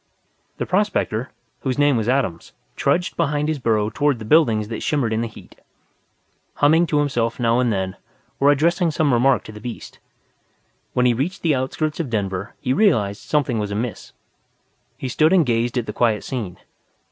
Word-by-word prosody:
The - - -2
prospector, 185 - 0 0.3
whose 130 -1 -2
name 145 -1 +4
was 115 0 0
Adams, 125 -11 -1 0.2
trudged 175 0 0
behind 150 -2 0
his 155 -2 -1
burro 110 -3 +1
toward 145 -3 +1
the 110 - -8
buildings 110 -6 +3
that 115 - -5
shimmered 130 -7 0
in 110 - 0
the 115 - -2
heat, 110 - -15 1.0
humming 160 +4 +4
to 150 - 0
himself 120 -6 0
now 115 0 +2
and 125 -2 +2
then 95 -2 -2 0.4
or 140 - +4
addressing 170 +4 +2
some 150 -3 +1
remark 125 +2 +3
to - - -10
the 105 0 -11
beast. 120 +1 -8 0.9
When 125 - +2
he 125 - +4
reached 165 +11 -3
the 160 -3 +3
outskirts 150 +4 -2
of 160 -6 -2
Denver 100 -3 -3
he 130 - 0
realized 115 - +2
something 140 -6 0
was 105 -1 -2
amiss. 105 0 -4 0.9
He 130 - -4
stood 155 +6 +2
and 180 -4 +4
gazed 120 +1 0
at 120 - 0
the 105 - -5
quiet 110 -3 +1
scene. 105 -9 -5
125 Hz, 180 wpm, -21 LUFS, 110-150 Hz, 1.0 s, name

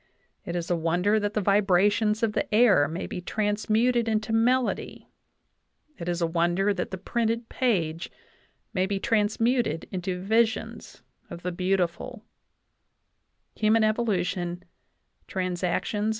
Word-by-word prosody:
It 170 - -4
is 175 0 -3
a - - +3
wonder 175 +6 +1
that 205 0 -3
the 215 - +1
vibrations 205 +2 +3
of 220 -2 +1
the - - -2
air 210 -10 +5
may 165 +4 -4
be 180 - -6
transmuted 220 +5 0
into 220 0 -1
melody 245 +3 0 0.9
It 170 - -4
is 175 0 -2
a - - +3
wonder 175 +4 +1
that - - -3
the 190 - -5
printed 230 +4 -2
page 170 -10 -1 0.6
may 185 -2 +1
be 195 0 -2
transmuted 225 - +1
into 180 -1 -3
visions 220 +4 -1 0.3
of 170 - -9
the 180 - -2
beautiful" 185 +5 -2 1.3
(Human 220 +1 +2
Evolution, 185 -5 -1 0.6
Trans. 185 -1 -3
205 Hz, 125 wpm, -26 LUFS, 175-225 Hz, 1.3 s, air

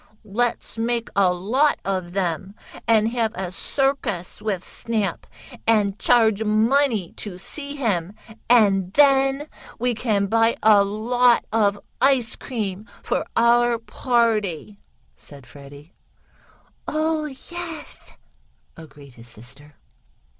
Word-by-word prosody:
"Let's 230 +2 -2
make 230 0 -1
a 195 -2 +4
lot 235 +12 +1
of 185 -1 -3
'em, 190 +2 -2 0.3
and 220 -1 +4
have 230 -2 -1
a 180 -2 -4
circus 270 -6 -2
with 200 -4 -3
Snap, 215 -6 -3 0.4
and 210 -3 +2
charge 220 -3 +3
money 220 -2 +2
to 195 -4 -7
see 280 +9 -6
him, 200 - -1 0.4
and 195 -6 +4
then 275 0 +3 0.3
we 245 +1 0
can 215 -3 0
buy 225 +3 +2
a 210 -2 +6
lot 235 +4 +2
of 205 -2 +2 0.2
ice 260 -4 +3
cream 210 -4 -5 0.2
for - - -2
our 235 0 +4
party!" 215 - -1 0.4
said 140 -3 -14
Freddie. 140 +5 -14 0.9
"Oh, 310 0 0 0.3
yes!" 345 -2 -8 0.6
agreed 145 -4 -14
his 115 0 -13
sister. 130 +6 -13
215 Hz, 110 wpm, -22 LUFS, 190-240 Hz, 0.9 s, a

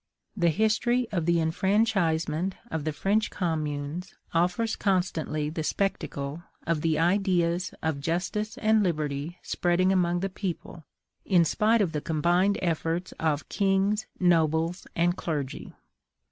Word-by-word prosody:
The 175 -4 +3
history 220 +6 +2
of 170 -5 -1
the 170 0 +3
enfranchisement 175 -1 +1 0.2
of 160 -2 -3
the 155 - 0
French 200 +8 +1
communes 155 0 -3 0.2
offers 180 +7 +1
constantly 175 -6 0
the 160 - -3
spectacle 155 -4 -2 0.2
of 160 -2 0
the 160 -1 +1
ideas 175 -1 +1
of 160 -3 0
justice 185 +7 -2
and 220 0 +3
liberty 155 -2 -2
spreading 180 +1 +1
among 175 -2 +2
the 195 - -1
people, 175 -4 -6 0.4
in 175 -4 +4
spite 220 +6 +3
of 175 - -1
the 150 -2 -2
combined 175 +6 +2
efforts 165 +1 -1
of 155 -2 0
kings, 200 +2 +1
nobles, 165 0 +2
and 175 +2 +2
clergy. 145 -5 -4
175 Hz, 130 wpm, -27 LUFS, 160-195 Hz, 0.4 s, in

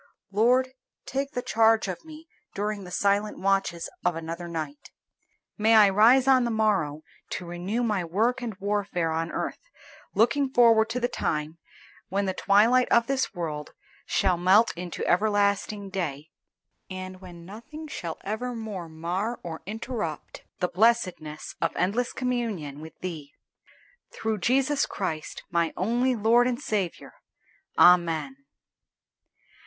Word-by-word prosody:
Lord, 250 +5 +3 0.3
take 275 +1 -3
the 245 - -3
charge 225 -1 +3
of 185 -2 -5
me 315 0 -12 0.3
during 205 -1 -3
the - - -9
silent 200 +3 +1
watches 195 -3 0 0.2
of 180 -2 +1
another 165 +1 -5
night. 155 -4 -6 0.7
May 220 +2 +5
I 210 -2 +7
rise 240 +6 +5
on 260 -2 +5
the 240 - 0
morrow 200 -10 0 0.3
to 180 - -4
renew 180 +7 -3
my 210 -5 0
work 220 +10 0
and 230 -4 -4
warfare 200 -4 -1
on 165 +1 -2
earth, - - -3 0.6
looking 245 +6 +3
forward 230 -3 +5
to 240 +2 -2
the 245 - +1
time 155 -5 -3 0.5
when 200 +2 0
the 190 - -1
twilight 225 +7 +4
of 235 0 +4
this 270 0 -1
world 155 -4 -5 0.3
shall 185 -3 +2
melt 190 +6 +4
into 175 0 -5
everlasting 200 +1 +1
day, 160 -5 -4 0.6
and 185 0 -7
when 175 -2 -11
nothing 300 - -9
shall 170 - -5
evermore 215 -5 -4
mar 180 +9 -3
or 165 -2 -6
interrupt 215 - -5 0.2
the 180 - +2
blessedness 185 -6 0
of - - 0
endless 205 +8 0
communion 225 - -3
with 160 0 -11
Thee: 160 -6 -6 0.8
through 220 -1 -2
Jesus 270 +7 +2
Christ, 160 -5 -4
my 170 -1 +1
only 240 +6 +1
Lord 230 +3 +4
and 250 -1 -1
Saviour. 205 -10 -3 0.6
Amen. 175 - +4
200 Hz, 135 wpm, -26 LUFS, 175-235 Hz, 0.8 s, I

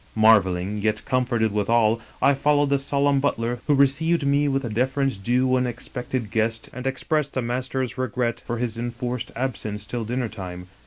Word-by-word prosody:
" - - -29
Marveling, 100 -1 +3
yet 110 0 -1
comforted 120 -4 +1
withal, 110 +2 +2 0.2
I 140 - +6
followed 145 +1 +2
the 140 - +3
solemn 140 0 +2
butler, 120 -3 -1
who 145 - +4
received 140 +4 +2
me 140 +1 +3
with 135 0 0
the 120 - -3
deference 130 +4 0
due 120 +6 +1
to 130 - +3
an 125 0 +1
expected 125 -1 -4
guest 115 0 -1
and 125 +1 -4
expressed 145 +2 -1
the 130 - +1
master's 130 +1 -2
regret 120 -1 -1
for 120 - -3
his 115 -1 -3
enforced 120 +1 -3
absence 110 -5 -3
till 120 +1 -4
dinner 120 +2 -2
time. 90 -4 -8
125 Hz, 180 wpm, -24 LUFS, 110-135 Hz, 0.2 s, I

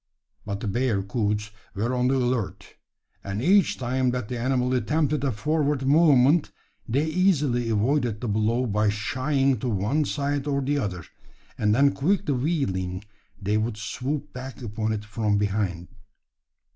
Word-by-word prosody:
But 100 -1 -3
the 110 - -3
bearcoots 105 -1 -1 0.2
were 115 +5 -1
on 125 0 +1
the 135 - +2
alert; 125 -5 -2 0.5
and 100 +1 -4
each 185 - +3
time 130 +1 0
that 125 -3 -3
the 125 -1 -3
animal 125 0 +1
attempted 150 +4 0
a 135 - +1
forward 145 +3 0
movement, 145 0 +5 0.4
they 140 +6 +1
easily 150 -9 +1
avoided 115 +1 +1
the 120 - -4
blow 110 +4 +1
by 105 -1 +1
shying 135 +5 0
to 125 - -2
one 115 +9 0
side 145 0 -2
or 140 -1 +1
the 140 +1 0
other; 90 -8 -4 0.5
and 105 0 +2
then 140 +2 +5
quickly 175 +1 +1
wheeling, 100 - -1 0.4
they 105 +1 0
would 110 0 -2
swoop 135 +7 -4
back 130 +1 -8
upon 110 0 -2
it 105 -1 -3
from 105 -1 0
behind. 100 -4 -1
125 Hz, 150 wpm, -25 LUFS, 105-140 Hz, 0.5 s, movement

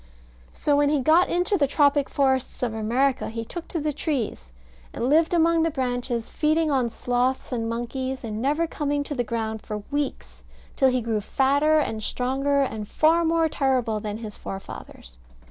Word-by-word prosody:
So 290 - +1
when 290 0 +3
he 295 -1 +2
got 315 +7 +4
into 355 +2 +1
the 280 - +3
tropic 285 0 +3
forests 265 -2 0
of 235 -3 0
America, 245 +5 0
he 230 +1 -5
took 345 +7 -7
to 335 - -3
the 300 0 -1
trees, 240 - -3 0.4
and 240 - -2
lived 315 +4 +4
among 335 -1 +3
the 330 - +2
branches, 245 -4 -2
feeding 310 0 +1
on 255 -4 +1
sloths 245 +3 -1
and 225 -2 -2
monkeys, 260 +3 -3
and 220 -1 -4
never 295 +6 +1
coming 290 -3 -2
to 290 - -5
the 245 -3 -1
ground 220 -1 -3
for 210 -1 -6
weeks, 65 - -3 0.3
till 265 - +4
he 255 -1 0
grew 220 -2 -1
fatter 285 +7 +2
and 225 -8 -1
stronger 275 +4 0
and 220 -5 -4
far 325 +7 +3
more 330 0 +2
terrible 255 -7 0
than 210 0 -4
his 220 -2 -8
forefathers. - - -9
265 Hz, 180 wpm, -25 LUFS, 230-300 Hz, 0.4 s, got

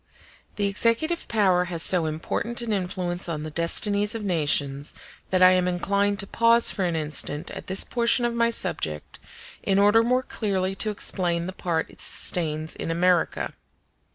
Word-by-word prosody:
The 205 - -1
executive 230 - +1
power 190 -5 +2
has 170 -2 +1
so 175 -4 +4
important 170 +9 -3
an 225 -2 -2
influence 180 -2 -3
on 155 -2 -4
the 155 - -6
destinies 205 +6 0
of 225 - -5
nations 145 -6 -1 0.3
that 185 -1 +2
I 185 - +8
am 180 -1 +2
inclined 200 +3 0
to - - -7
pause 230 +3 +4
for 190 - -2
an 170 -2 -1
instant 155 0 -3
at - - -9
this 190 +1 +3
portion 240 0 0
of 240 - -1
my 235 0 +2
subject, 75 - -1 0.4
in 195 - 0
order 205 +3 +5
more 250 +2 +1
clearly 195 -6 -2
to 215 +2 -1
explain 175 -4 -2
the 185 - -6
part 170 -4 -3
it - - -13
sustains 155 -2 0
in - - -6
America. 175 +1 0
185 Hz, 170 wpm, -24 LUFS, 170-210 Hz, 0.4 s, I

